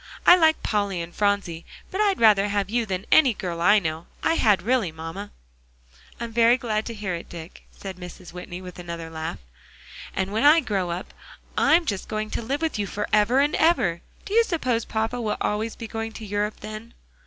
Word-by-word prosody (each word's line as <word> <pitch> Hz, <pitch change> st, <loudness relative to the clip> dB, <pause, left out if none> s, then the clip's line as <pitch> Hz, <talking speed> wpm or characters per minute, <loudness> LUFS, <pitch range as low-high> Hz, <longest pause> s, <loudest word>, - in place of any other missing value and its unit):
I 355 Hz, -, +10 dB
like 320 Hz, -3 st, +3 dB
Polly 200 Hz, -4 st, 0 dB
and 170 Hz, 0 st, -6 dB
Phronsie; 200 Hz, -5 st, 0 dB, 0.3 s
but 380 Hz, -, -1 dB
I'd 400 Hz, -3 st, +2 dB
rather 210 Hz, -3 st, +5 dB
have 200 Hz, -1 st, -1 dB
you 235 Hz, -1 st, 0 dB
than 190 Hz, +1 st, -3 dB
any 265 Hz, -8 st, +6 dB
girl 170 Hz, -3 st, -4 dB
I 205 Hz, +5 st, +6 dB
know; 160 Hz, -3 st, -3 dB, 0.2 s
I 325 Hz, -, +3 dB
had 215 Hz, -, +3 dB
really, 230 Hz, -6 st, +1 dB
mamma." 165 Hz, +6 st, -7 dB, 0.9 s
"I'm 235 Hz, 0 st, -5 dB
very 235 Hz, +1 st, +5 dB
glad 220 Hz, -4 st, -2 dB
to 230 Hz, -, -5 dB
hear 205 Hz, -4 st, -3 dB
it, 170 Hz, -, -6 dB
Dick," 170 Hz, +1 st, -10 dB
said 190 Hz, -2 st, -9 dB
Mrs. 180 Hz, -1 st, -10 dB
Whitney, 180 Hz, 0 st, -8 dB
with 180 Hz, -1 st, -10 dB
another 170 Hz, -2 st, -6 dB
laugh. 160 Hz, 0 st, -4 dB, 0.8 s
"And 190 Hz, +1 st, -2 dB
when 220 Hz, -, +1 dB
I 300 Hz, +3 st, +7 dB
grow 200 Hz, -, -1 dB
up, 175 Hz, +3 st, -5 dB, 0.4 s
I'm 335 Hz, +1 st, +4 dB
just 200 Hz, -9 st, -3 dB
going 215 Hz, 0 st, -3 dB
to -, -, -2 dB
live 275 Hz, +7 st, -3 dB
with 320 Hz, -9 st, -1 dB
you 205 Hz, -, -1 dB
forever 210 Hz, +6 st, +2 dB
and 290 Hz, +1 st, +1 dB
ever. 200 Hz, -, +2 dB, 0.2 s
Do 405 Hz, -, -6 dB
you 465 Hz, +1 st, +6 dB
suppose 255 Hz, -, -1 dB
papa 225 Hz, +2 st, -2 dB
will 215 Hz, -2 st, -1 dB
be -, -, -15 dB
always 215 Hz, +2 st, -1 dB
going 225 Hz, -1 st, -5 dB
to 220 Hz, -, -8 dB
Europe 205 Hz, +1 st, -2 dB
then?" 215 Hz, +2 st, -8 dB
210 Hz, 200 wpm, -24 LUFS, 185-235 Hz, 0.9 s, I